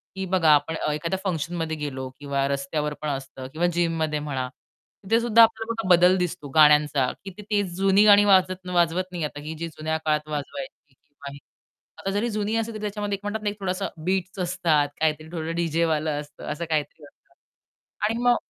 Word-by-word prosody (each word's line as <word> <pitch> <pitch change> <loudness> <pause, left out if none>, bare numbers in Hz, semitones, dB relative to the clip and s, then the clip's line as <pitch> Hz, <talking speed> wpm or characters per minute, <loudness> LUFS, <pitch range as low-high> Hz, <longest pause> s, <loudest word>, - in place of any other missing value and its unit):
की 190 0 -3
बघा 180 -4 +2
आपण 150 +2 +3
अ, 150 - -1
एखाद्या 170 +5 -2
फंक्शनमध्ये 165 -3 -2
गेलो 130 -3 -5
किंवा 140 -1 -1
रस्त्यावर 140 +2 -2
पण 150 - -2
असतं 135 -1 -5
किंवा 175 +3 +1
जिममध्ये 165 -3 0
म्हणा 135 -4 -3 0.6
तिथे 225 +4 +2
सुद्धा 230 -1 +6
आपल्याला 225 -1 0
बदल 180 +1 +6
दिसतो 180 -4 -3
गाण्यांचा, 150 -3 +5
की 195 - -6
ते 210 0 0
जुनी 195 +2 +4
गाणी 205 0 +7
वाजत 185 -1 +3
वाजवत 175 +1 +2
नाही 175 -3 -4
आता, 145 -1 -4
ही 155 +2 -6
जी 170 - -3
जुन्या 160 0 -3
काळात 150 0 0
वाजवायची. 150 0 -6 1.1
आता 195 - -3
जरी 210 +4 0
जुनी 215 0 -1
असली, 225 0 -1
तरी 215 - -7
त्याच्यामध्ये 205 -1 -2
एक - - -28
म्हणतात 205 +1 -3
ना 210 - +1
एक 205 - -8
थोडसा 195 0 -2 0.2
बीट्स 190 0 -1
असतात, 170 -5 +1
काहीतरी 155 0 0
थोडं 165 -1 -4
डीजेवालं 160 -2 0
असतं 145 -1 -12
असं 150 +3 -4
काहीतरी 155 0 -2
असतं. 145 - -23 0.7
आणि 225 +2 0
मग 245 0 +5
170 Hz, 180 wpm, -25 LUFS, 150-195 Hz, 1.1 s, गाणी